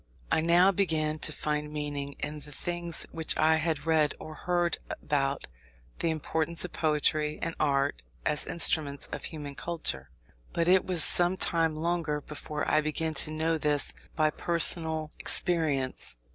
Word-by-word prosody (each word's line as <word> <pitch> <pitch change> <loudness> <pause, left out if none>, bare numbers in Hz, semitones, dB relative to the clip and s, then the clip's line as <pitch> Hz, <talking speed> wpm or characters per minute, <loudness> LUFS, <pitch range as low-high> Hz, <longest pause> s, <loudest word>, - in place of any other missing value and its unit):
I - - +3
now 175 +4 +5
began 155 -5 0
to 155 - -1
find 150 0 -3
meaning 145 -2 -4
in 150 +1 -4
the 145 0 -10
things, 175 +2 -3
which 160 -1 -2
I 160 +1 +4
had 160 -2 -2
read 155 -2 +2
or 155 - -9
heard 175 +2 -1
about 140 -2 -1 0.5
the 165 - 0
importance 160 +2 0
of 180 - -8
poetry 150 -1 0
and 165 - -3
art 140 -1 0 0.2
as 150 - 0
instruments 150 -4 +2
of - - -5
human 145 -3 -7
culture. 140 - -1 0.4
But 170 0 0
it 185 +1 +4
was 175 -4 +3
some 175 +4 +4
time 165 -3 0
longer 165 -2 -1
before 150 0 -6
I 155 - +3
began 155 +1 -2
to 150 - 0
know 160 +1 -1
this 145 -1 +1 0.2
by 155 -1 +2
personal 160 -2 +4
experience. 150 - 0
155 Hz, 155 wpm, -28 LUFS, 150-165 Hz, 0.5 s, now